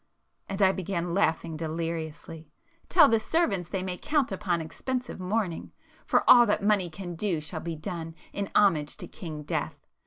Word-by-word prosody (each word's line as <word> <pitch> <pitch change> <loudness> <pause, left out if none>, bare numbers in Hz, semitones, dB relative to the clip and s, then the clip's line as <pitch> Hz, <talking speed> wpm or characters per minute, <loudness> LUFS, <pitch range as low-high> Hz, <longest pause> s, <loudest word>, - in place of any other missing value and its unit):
—and 195 +1 0
I 190 - +6
began 180 -2 -3
laughing 165 -3 +1
deliriously—"Tell 165 - -1
the 225 -3 +3
servants 215 - 0
they 190 -2 -2
may 180 -1 -4
count 290 -3 +1
upon 175 -3 -1
expensive 250 +11 -4
mourning,—for 185 -2 -2
all 240 -1 +9
that 205 - +1
money 200 -4 +2
can 175 +2 -7
do 175 -1 -1
shall 155 +2 -5
be 165 0 -4
done 165 +1 -6 0.2
in 200 -1 -3
homage 165 -8 +3
to - - -7
King 155 -4 -7
Death! 145 - -3
180 Hz, 155 wpm, -28 LUFS, 165-210 Hz, 0.2 s, all